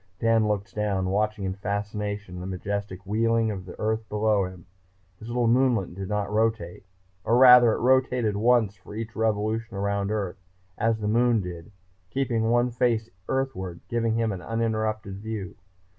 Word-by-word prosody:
Dan 115 Hz, 0 st, +2 dB
looked 105 Hz, -1 st, -2 dB
down, 100 Hz, -3 st, -1 dB
watching 105 Hz, 0 st, 0 dB
in 95 Hz, -1 st, -1 dB
fascination 100 Hz, -1 st, -4 dB
the 90 Hz, -, -6 dB
majestic 100 Hz, +1 st, -4 dB
wheeling 115 Hz, +2 st, +1 dB
of 95 Hz, -3 st, -6 dB
the 90 Hz, -, -10 dB
Earth 110 Hz, 0 st, -1 dB
below 105 Hz, -2 st, +2 dB
him. 90 Hz, -2 st, -10 dB, 0.5 s
His 110 Hz, -, -10 dB
little 120 Hz, 0 st, 0 dB
moonlet 120 Hz, -7 st, +2 dB
did 95 Hz, +1 st, -6 dB
not 105 Hz, -1 st, -1 dB
rotate, 110 Hz, -5 st, -1 dB, 0.4 s
or 115 Hz, -, +3 dB
rather 125 Hz, -2 st, +8 dB
it -, -, -3 dB
rotated 125 Hz, -3 st, +2 dB
once 110 Hz, -1 st, +3 dB
for 95 Hz, +2 st, -12 dB
each 115 Hz, 0 st, -5 dB
revolution 110 Hz, 0 st, -1 dB
around 100 Hz, 0 st, -1 dB
Earth, 100 Hz, -3 st, -3 dB, 0.4 s
as 115 Hz, +1 st, 0 dB
the 105 Hz, -, -1 dB
Moon 120 Hz, +1 st, +3 dB
did, 90 Hz, -2 st, -7 dB, 0.4 s
keeping 115 Hz, -4 st, 0 dB
one 120 Hz, +1 st, +2 dB
face 115 Hz, -2 st, 0 dB, 0.2 s
earthward, 95 Hz, -11 st, -2 dB
giving 115 Hz, -1 st, 0 dB
him 115 Hz, -1 st, +1 dB
an 95 Hz, -2 st, -5 dB
uninterrupted 110 Hz, -3 st, -2 dB
view. 105 Hz, -3 st, -5 dB
110 Hz, 160 wpm, -26 LUFS, 100-115 Hz, 0.5 s, rather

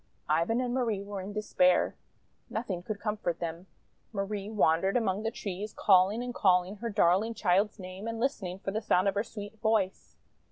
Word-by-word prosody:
Ivan 170 Hz, +10 st, +2 dB
and 245 Hz, -1 st, -1 dB
Marie 230 Hz, -6 st, 0 dB
were 200 Hz, -1 st, -5 dB
in 195 Hz, +2 st, -6 dB
despair. 200 Hz, -3 st, +2 dB, 0.5 s
Nothing 205 Hz, -6 st, -3 dB
could 205 Hz, +3 st, -5 dB
comfort 210 Hz, -6 st, -2 dB
them. 170 Hz, +2 st, -5 dB, 0.4 s
Marie 200 Hz, -1 st, -3 dB
wandered 195 Hz, -1 st, +2 dB
among 205 Hz, -4 st, 0 dB
the 225 Hz, -, -1 dB
trees, 210 Hz, -2 st, -5 dB
calling 195 Hz, +4 st, +4 dB
and 245 Hz, 0 st, -4 dB
calling 185 Hz, 0 st, +2 dB
her 235 Hz, +2 st, -4 dB
darling 205 Hz, +2 st, +2 dB
child's 200 Hz, +2 st, +2 dB
name 185 Hz, +2 st, -7 dB
and 230 Hz, 0 st, -3 dB
listening 205 Hz, -8 st, -2 dB
for 195 Hz, 0 st, -4 dB
the 215 Hz, +2 st, -2 dB
sound 185 Hz, -2 st, +2 dB
of 195 Hz, -, +2 dB
her 205 Hz, +1 st, 0 dB
sweet 215 Hz, -1 st, -9 dB
voice. 215 Hz, -4 st, 0 dB
205 Hz, 175 wpm, -30 LUFS, 185-220 Hz, 0.5 s, calling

